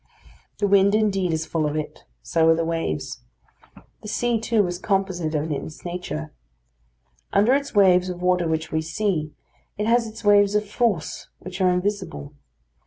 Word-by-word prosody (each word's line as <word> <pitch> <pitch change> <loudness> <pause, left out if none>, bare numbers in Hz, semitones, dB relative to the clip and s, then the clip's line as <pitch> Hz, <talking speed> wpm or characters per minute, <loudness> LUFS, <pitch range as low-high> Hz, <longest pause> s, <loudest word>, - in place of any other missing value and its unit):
The 205 - 0
wind 200 0 +4
indeed 195 -5 +1
is 160 0 -1
full 155 -1 -1
of 150 - -3
it; 155 -1 -5 0.2
so 165 -1 +2
are 165 - +6
the 165 0 -1
waves. 165 - -3 0.8
The - - -9
sea, 235 +2 0
too, 225 -2 +2
is 175 0 -4
composite 190 -5 -1
in 155 +1 -1
its 150 +3 -6
nature. 175 - -5 1.0
Under 210 +6 +4
its 280 -3 -1
waves 185 -2 +5
of 180 -1 -5
water 180 -1 +1
which 160 0 -2
we 160 - 0
see, 160 -1 -2 0.4
it 210 - -1
has 230 +1 +3
its 225 +1 -10
waves 205 0 +5
of 210 0 +1
force 210 -6 -1
which 185 +1 -7
are 185 - +4
invisible. 180 -5 -2
180 Hz, 170 wpm, -23 LUFS, 160-205 Hz, 1.0 s, are